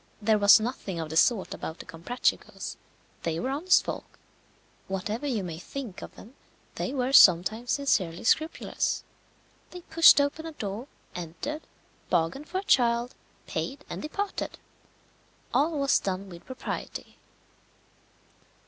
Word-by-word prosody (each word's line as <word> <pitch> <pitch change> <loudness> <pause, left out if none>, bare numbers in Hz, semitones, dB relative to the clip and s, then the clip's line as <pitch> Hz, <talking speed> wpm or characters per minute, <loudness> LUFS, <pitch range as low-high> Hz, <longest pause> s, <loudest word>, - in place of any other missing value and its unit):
There 215 0 +2
was 205 +2 +8
nothing 215 -6 -4
of 160 -1 -4
the - - -4
sort 200 +4 +3
about 160 - -6
the - - -10
Comprachicos; 170 +10 -2 0.5
they 165 -1 -2
were 260 - -2
honest 330 +7 +3
folk. - - -7 0.7
Whatever 210 +8 -3
you 230 -8 -1
may 165 -3 -6
think 235 0 -7
of - - -9
them, 230 - -13 0.4
they - - -3
were 265 -1 -1
sometimes 215 +3 +6
sincerely 190 - 0
scrupulous. 315 +8 0 0.7
They 360 - -9
pushed 330 -2 +7
open 285 +3 -1
a 325 - -7
door, 215 0 -5 0.3
entered, 175 - -5 0.5
bargained 175 - 0
for 370 - -2
a 380 - -2
child, 240 -6 +2 0.3
paid, 280 +2 -4
and - - -5
departed. 400 +6 -4 1.0
All 310 +2 +2
was 275 -1 +3
done 195 0 -3
with 170 -2 -12
propriety. 260 0 -6
235 Hz, 135 wpm, -27 LUFS, 185-285 Hz, 1.0 s, was